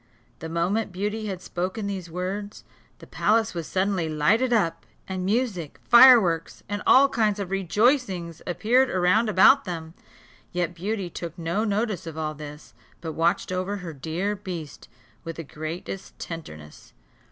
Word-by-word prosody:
The 160 - -6
moment 185 +7 0
Beauty 210 +4 -3
had 185 -2 -5
spoken 185 +4 -3
these 190 -4 -4
words, 190 +4 -5 0.3
the - - -13
palace 220 +1 +1
was 170 -3 -5
suddenly 185 -3 0
lighted 205 +12 +2
up, 170 -8 +1 0.2
and 185 -1 -3
music, 195 - -1
fireworks, 235 -10 +6
and 205 +1 -3
all 275 +2 +7
kinds 215 -6 0
of 195 -2 -4
rejoicings, 195 - +1
appeared 245 +8 +2
round 185 +5 +2
about 215 +8 +6
them. 165 -3 -6 0.6
Yet 175 -1 -1
Beauty 190 +1 -3
took 170 -1 -7
no 170 +5 -1
notice 210 -4 -1
of 160 -1 -7
all 155 -1 -2
this, 150 0 -10 0.3
but 165 -1 -5
watched 165 +3 0
over 185 +2 -2
her 175 -4 -7
dear 165 +8 -2
beast 165 - -8 0.3
with 165 -1 -6
the 165 - -6
greatest 160 +5 -7
tenderness. 80 - -9
185 Hz, 150 wpm, -25 LUFS, 165-210 Hz, 0.6 s, all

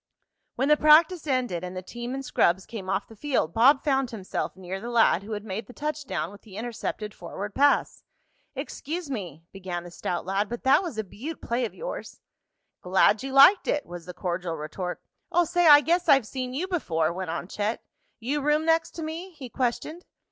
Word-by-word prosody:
When 270 - 0
the 300 - +6
practice 310 +2 +5
ended 245 - 0
and 180 0 -6
the 185 - -5
team 240 +6 -6
and 270 0 -5
scrubs 180 -4 +2
came 200 -5 -7
off - - -1
the 225 - -14
field 240 - -1
Bob 265 +5 +5
found 270 -3 +1
himself 210 -6 -4
near 190 +1 -6
the 235 - -5
lad 230 -6 +4
who 215 +2 -7
had 205 -1 -4
made 205 +1 -5
the 250 - -12
touchdown 285 - -3
with 205 - -14
the 205 -3 -12
intercepted 220 -2 -4
forward 205 0 -7
pass. 285 +1 +2 0.5
"Excuse 325 0 -5
me," 175 - -6
began 185 -3 -5
the 175 - -10
stout 175 0 -3
lad, 195 +2 -1
"but 240 0 -6
that 265 +6 +5
was 340 - -6
a 220 - -1
beaut 270 - -7
play 240 +1 -1
of 220 - -7
yours." - - -7 0.6
"Glad 190 +4 +3
you 270 0 -5
liked 275 +9 +7
it," 295 - 0
was 175 0 -9
the 180 - -6
cordial 175 -2 -3
retort. 170 +4 -5 0.3
"Oh, 350 0 +3
say, 350 +1 +2
I 290 -1 +10
guess 345 +3 +1
I've 270 -4 +6
seen 255 +2 -5
you 350 +7 -2
before!" 165 - 0
went 185 -1 -5
on 170 +1 -4
Chet. 210 +3 -3 0.4
"You 275 +6 -2
room 300 +2 +2
next 325 0 +2
to 330 - -5
me?" 335 +4 -6
he 275 -6 -9
questioned. 265 +8 -2
240 Hz, 205 wpm, -26 LUFS, 190-295 Hz, 0.6 s, I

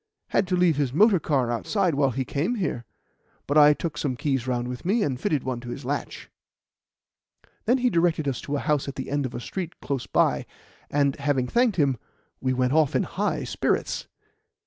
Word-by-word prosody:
Had 195 - +1
to 185 - +1
leave 175 -4 +3
his 140 -4 0
motor 200 +3 +5
car 135 -5 0
outside 180 - 0
while 140 -1 +2
he 130 +1 -2
came 165 - -1
here. 150 - -2 0.6
But 145 - -1
I 150 -1 +8
took 165 -1 -4
some 135 -4 -1
keys 135 -1 -1
round 120 -1 -1
with 125 0 -6
me, 210 +5 +2
and 130 -6 -2
fitted 150 -4 0
one 130 -2 -3
to 120 0 -9
his 135 +2 -6
latch." 145 +2 -4 1.2
He - - -27 0.3
then 250 -1 +1
directed 165 -3 +2
us 135 - -2
to 145 - -3
a - - 0
house 150 -3 0
at 140 - -5
the 130 -1 -5
end 145 -2 0
of - - -10
a - - -3
street 175 +6 -6
close 135 -3 -3
by, - - +1 0.4
and, 140 -1 +2
having 140 -3 0
thanked 235 - +2
him, 140 -5 +2 0.4
we 130 - 0
went 130 0 +1
off 155 -2 +3
in - - +3
high - - -2
spirits. - - -1
145 Hz, 205 wpm, -25 LUFS, 130-170 Hz, 1.2 s, I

